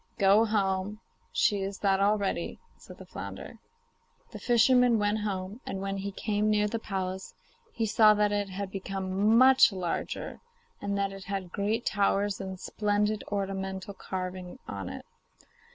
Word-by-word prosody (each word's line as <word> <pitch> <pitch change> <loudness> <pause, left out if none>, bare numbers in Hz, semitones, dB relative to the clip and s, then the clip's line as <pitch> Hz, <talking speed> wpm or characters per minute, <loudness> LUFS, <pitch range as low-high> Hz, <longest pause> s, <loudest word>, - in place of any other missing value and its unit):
'Go 200 +1 +5
home; 200 -1 0 0.3
she 205 -3 +2
is 195 0 -3
that 195 -1 +2
already,' 200 0 0 0.2
said - - -14
the - - -11
flounder. - - -8 0.7
The - - -8
fisherman 245 0 +4
went 205 +1 +1
home, 200 +2 -4
and 195 - -4
when 195 0 -3
he 200 +1 -4
came 210 +1 0
near 210 0 +3
the 230 +2 -3
palace 190 -3 -4 0.4
he 225 - -1
saw 215 0 +6
that 210 0 +2
it 205 -1 -1
had 195 +1 -5
become 195 +2 0
much 260 -1 +7
larger, 185 -3 -4 0.4
and 200 0 -2
that 200 0 0
it 195 -1 -9
had 195 -2 -4
great 215 +4 -1
towers 200 0 +1
and 190 -1 -6
splendid 210 +1 0
ornamental 195 -1 -3
carving 185 -1 -5
on 100 -2 -5
it. - - -8
200 Hz, 150 wpm, -29 LUFS, 190-210 Hz, 0.7 s, much